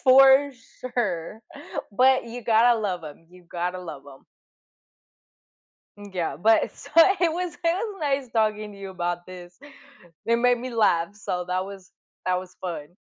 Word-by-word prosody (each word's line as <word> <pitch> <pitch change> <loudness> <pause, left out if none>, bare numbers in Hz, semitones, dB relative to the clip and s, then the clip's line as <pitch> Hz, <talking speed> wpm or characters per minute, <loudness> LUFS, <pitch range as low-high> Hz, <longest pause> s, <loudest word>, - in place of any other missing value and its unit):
For 270 +2 +7 0.3
sure. 220 -5 -3 0.5
But, 260 +4 +4
you 240 +1 -8
gotta 230 +1 +4
love 185 -5 -3
'em, 155 +2 -11
you've 180 -1 -18
gotta 180 +1 -3
love 155 -6 -8
'em. 135 -1 -14 1.7
Mm, 205 -1 -12
yeah, 165 -6 -2
but 220 +7 +4
it, - - -11
so - - -12 0.3
it 340 -3 +3
was 355 0 -3
it - - -19
was 390 +5 0
nice 275 -4 -1
talking 215 -2 0
to 200 - -13
you 195 -1 -7
about 175 -1 -3
this. 180 -1 -11 0.7
It 230 - +3
made 245 +1 +3
me 255 +2 -6
laugh, 205 -5 +1
so 180 -4 -3
that 185 +1 -1
was 195 -1 -11 0.4
that 180 0 +2
was 185 0 -10
fun. 175 -1 -6
205 Hz, 165 wpm, -25 LUFS, 180-245 Hz, 1.7 s, For